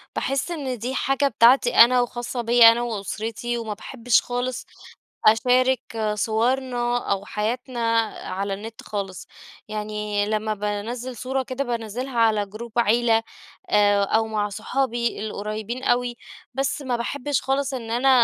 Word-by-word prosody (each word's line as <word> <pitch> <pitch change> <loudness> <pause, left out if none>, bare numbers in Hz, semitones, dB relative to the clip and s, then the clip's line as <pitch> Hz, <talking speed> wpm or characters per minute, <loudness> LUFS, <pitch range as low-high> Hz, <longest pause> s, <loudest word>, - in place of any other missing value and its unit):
باحِس 275 +5 -1
إن 275 -7 -3
دي 250 +4 -3
حاجة 275 +1 +1
بتاعتي 245 0 +4
أنا 250 +1 +7
وخاصة 240 0 -3
بيَّ 235 +1 +4
أنا 230 +1 +7
وأسرتي، 230 +1 -3
وما 225 -2 -4
باحبش 235 +2 +1
خالص 245 0 -3 0.6
أشارك 255 +3 +4 0.3
صورنا 240 +2 0
أو 200 0 -1
حياتنا 240 +5 -3 0.5
على 195 +2 -2
النت 220 +3 -8
خالص. 195 -3 -5 0.4
يعني 210 -1 -2
لمّا 215 0 -1
بانزِّل 215 +5 -4
صورة 265 +1 -2
كده، 260 +1 -3
بانزِّلها 240 +1 -3
على 215 -2 +3
جروب 215 +4 -9
عيلة، 230 0 +3 0.5
آآ، 205 -1 +4
أو 220 +3 +1
مع 210 -1 -1
صحابي 235 +3 -1
القريبين 215 +4 -5
أوي. 245 -1 +1 0.4
بس 270 +2 -1
ما 255 -3 -1
باحبش 280 +3 -2
خالص 270 +1 -1
إن 230 -3 -5
أنا 245 +3 +2
235 Hz, 135 wpm, -23 LUFS, 215-255 Hz, 0.6 s, أنا